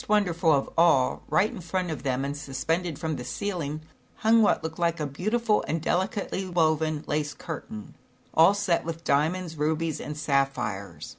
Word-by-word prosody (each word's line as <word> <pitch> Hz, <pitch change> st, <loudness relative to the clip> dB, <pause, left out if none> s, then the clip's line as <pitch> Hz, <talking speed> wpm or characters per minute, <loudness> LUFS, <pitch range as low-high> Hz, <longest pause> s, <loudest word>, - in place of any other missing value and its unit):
wonderful 180 Hz, -6 st, +3 dB
of 140 Hz, -2 st, +2 dB
all, 160 Hz, -7 st, +4 dB
right 210 Hz, +4 st, +3 dB
in -, -, -8 dB
front 180 Hz, +1 st, -2 dB
of 155 Hz, -, -5 dB
them 135 Hz, -1 st, -1 dB
and 140 Hz, +1 st, -3 dB
suspended 160 Hz, +3 st, -2 dB
from 160 Hz, -2 st, -3 dB
the 125 Hz, -, -5 dB
ceiling, 160 Hz, -4 st, -3 dB, 0.4 s
hung 225 Hz, +1 st, +4 dB
what 210 Hz, -, +3 dB
looked 160 Hz, +1 st, -5 dB
like 170 Hz, -1 st, +1 dB
a 150 Hz, -, -1 dB
beautiful 210 Hz, -, 0 dB
and 160 Hz, +3 st, 0 dB
delicately 190 Hz, +4 st, -1 dB
woven 160 Hz, -4 st, +1 dB
lace 150 Hz, 0 st, -2 dB
curtain, 110 Hz, -, -7 dB, 0.4 s
all 165 Hz, +5 st, +6 dB
set 200 Hz, -4 st, +1 dB
with 165 Hz, 0 st, -5 dB
diamonds, 160 Hz, +4 st, +1 dB
rubies 155 Hz, +1 st, -1 dB
and 150 Hz, 0 st, -6 dB
sapphires. 135 Hz, -9 st, -1 dB
160 Hz, 165 wpm, -27 LUFS, 145-180 Hz, 0.4 s, all